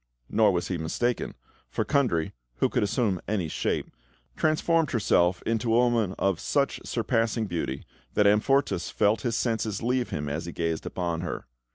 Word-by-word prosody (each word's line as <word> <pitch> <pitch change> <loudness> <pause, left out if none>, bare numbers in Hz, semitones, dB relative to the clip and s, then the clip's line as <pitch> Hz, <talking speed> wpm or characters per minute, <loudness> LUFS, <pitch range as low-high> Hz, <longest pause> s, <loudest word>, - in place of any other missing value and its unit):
Nor 110 -1 +5
was 85 -2 -1
he 90 -3 -2
mistaken, 120 +10 -1 0.3
for - - -1
Kundry 120 - +1 0.2
(who - - +1
could - - 0
assume 100 -3 0
any 100 -5 0
shape) - - -2 0.4
transformed 160 0 +2
herself 90 -6 +2
into 115 0 0
a - - +5
woman 120 -6 +2
of 95 -4 +1
such - - 0
surpassing 115 0 0
beauty 85 -8 -3 0.3
that 105 - +4
Amfortas 105 -1 +2
felt 105 +1 +2
his 115 -1 -1
senses 110 -3 -1
leave 125 +1 +1
him 75 0 -3
as 75 +4 -3
he - - -4
gazed 80 -1 -2
upon 85 -2 -2
her. 90 - -4
105 Hz, 165 wpm, -27 LUFS, 85-120 Hz, 0.4 s, Nor